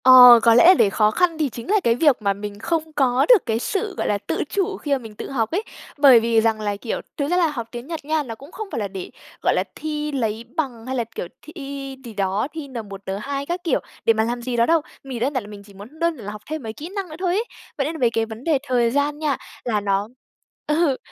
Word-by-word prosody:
Ờ, 250 -2 +10
có 230 - +6
lẽ 240 - +7
là 370 - +10
để 210 - +4
khó 210 +2 +3
khăn 345 +4 +1
thì 305 -3 0
chính 235 +4 -9
là 425 +1 +4
cái 230 - +3
việc 280 -2 +3
mà 200 -1 +2
mình 205 +1 -7
không 320 +4 -2
có 265 -3 +3
được 480 -7 +7
cái 225 0 0
sự, 400 - -2
gọi - - -1
là, 205 - +1
tự - - -3
chủ 390 -2 -1
khi 290 - -6
mà 280 - +4
mình 225 -4 -11
tự - - -7
học 230 -5 -1
ấy. 390 +6 0 0.3
Bởi 275 -5 +8
vì 225 0 +2
rằng 220 -1 +1
là, 205 -1 -1
kiểu, 220 +3 -4 0.2
thực 285 - 0
ra 355 - +3
là 345 -2 +4
học 245 -7 -4
tiếng 240 +2 -7
Nhật 325 -3 -6
nha, 310 0 0
nó 230 -4 -7
cũng 280 +7 -14
không 435 0 -6
phải - - -2
là 205 - -1
để, 190 -1 -7 0.3
gọi - - +3
là, - - +2
thi 300 -1 -3
lấy 230 -4 -2
bằng 255 -8 -3
hay 260 +1 -3
là, 240 - 0
kiểu, - - -4
thi 275 -4 -7
gì 230 - -8
đó, 200 +3 0
thi 315 -3 -6
N1, 220 -7 -7
N2 275 +9 -3
các 350 +3 -3
kiểu 325 - +1 0.3
để 225 - +6
mà 220 0 +1
làm 240 +2 -2
gì 245 0 -3
đó 235 0 +4
đâu, 330 +2 +3 0.2
mình 265 -3 -6
đơn 265 +5 0
giản 255 -5 -1
là - - -11
mình 205 -1 -10
chỉ 200 - -16
muốn 215 +11 -13
đơn 335 -1 +1
là 205 -4 -7
học 210 0 -9
thêm 310 -3 -4
mấy 220 -1 -5
kỹ 300 +9 -8
năng 390 -3 -3
nữa 310 - -8
thôi 365 -2 0
ấy. 420 +4 +1 0.3
Vậy 275 - 0
nên 315 +3 -3
là - - -7
về 240 - +4
cái 225 -1 0
vấn 225 +2 -9
đề 315 -2 +2
thời 245 -4 +1
gian 285 +2 0
nha 295 -4 0 0.3
là 215 -4 0
nó 200 0 0 0.6
ừ, 300 -3 +2
255 Hz, 280 wpm, -22 LUFS, 225-310 Hz, 0.6 s, Ờ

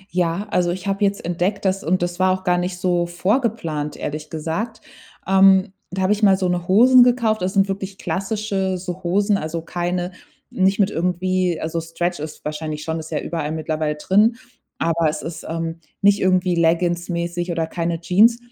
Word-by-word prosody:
Ja, 180 +3 0
also, 175 -1 +2
ich 180 +2 -4
habe 195 +1 -1
jetzt 200 -2 0
entdeckt, 180 +4 -1
dass 190 +1 0
und 175 +2 +1
das 175 +1 -3
war 185 0 +4
auch 185 - -18
gar 180 -1 +2
nicht 180 0 -3
so 175 -1 0
vorgeplant, 175 - -1
ehrlich 150 +1 -5
gesagt, 165 +9 -4 0.5
ähm, 190 0 +5 0.2
da 190 +1 -2
habe 190 +3 +3
ich 210 - -4
mal 195 -2 +5
so 185 -2 0
'ne 175 -1 -2
Hosen 245 +6 +7
gekauft. 235 -4 +3
Das 185 +1 -1
sind 195 0 +4
wirklich 195 0 -5
klassische 195 -1 -2
so 180 0 -6
Hosen, 200 +3 +2
also, 160 +1 -4
keine 175 +1 -2 0.4
nicht 195 +2 +1
mit 200 +1 +3
irgendwie 180 0 0
also, 165 +1 -2
Stretch 175 +1 -3
ist 155 0 -8
wahrscheinlich 150 0 -4
schon, 160 0 -3
ist 160 - -8
ja 150 -3 -2
überall 155 -3 -3
mittlerweile 155 -1 -2
drin. 210 +9 +3 0.4
Aber 165 -1 +1
es 150 - -5
ist, 165 -1 -7
ähm, 165 0 -3 0.2
nicht 200 0 +5
irgendwie 185 -1 +2
leggingsmäßig 170 +1 0
oder 165 -1 -1
keine 165 0 -2
Jeans. 215 +7 +4
180 Hz, 185 wpm, -21 LUFS, 165-195 Hz, 0.5 s, Hosen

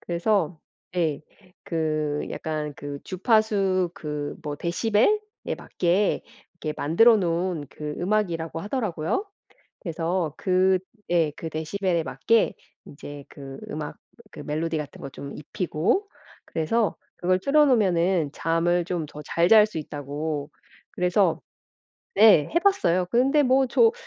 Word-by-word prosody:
그래서 175 -2 0 0.4
예. 160 -5 +1 0.4
그 155 -3 -1
약간 150 -2 -4
그 145 -1 -6
주파수 195 -2 +2
그 150 -1 -5
뭐 150 -2 -4
데시벨에 205 +7 +2 0.5
맞게 185 +3 0 0.3
이렇게 155 -3 -4
만들어 220 +10 +5
놓은 170 -4 -1
그 150 -1 -6
음악이라고 175 -5 -1
하더라고요. 210 - -2 0.6
그래서 170 -2 -2
그 185 0 +3 0.3
예. 165 -3 +3
그 160 - -6
데시벨에 170 +3 -1
맞게 215 - +2 0.3
이제 145 0 -10
그 135 -1 -10
음악, 150 -1 -5 0.3
그 - - -11
멜로디 160 +2 -2
같은 150 -2 -7
거 140 - -5
좀 140 +1 -8
입히고 180 - -1 0.4
그래서 205 +7 0 0.2
그걸 185 +1 +1
틀어 295 +9 +4
놓으면은 185 - +2
잠을 170 +2 +1
좀 170 -2 -3
더 150 0 -10
잘 170 +1 +2
잘 215 0 +8
수 210 -6 -6
있다고 145 0 -4 0.4
그래서 180 0 +2 0.7
네. 205 -9 +6
해 335 - +4
봤어요. 340 - +2
근데 270 +5 +4
뭐 265 +1 +4
저 455 - +5
170 Hz, 245 characters per minute, -25 LUFS, 155-205 Hz, 0.7 s, 잘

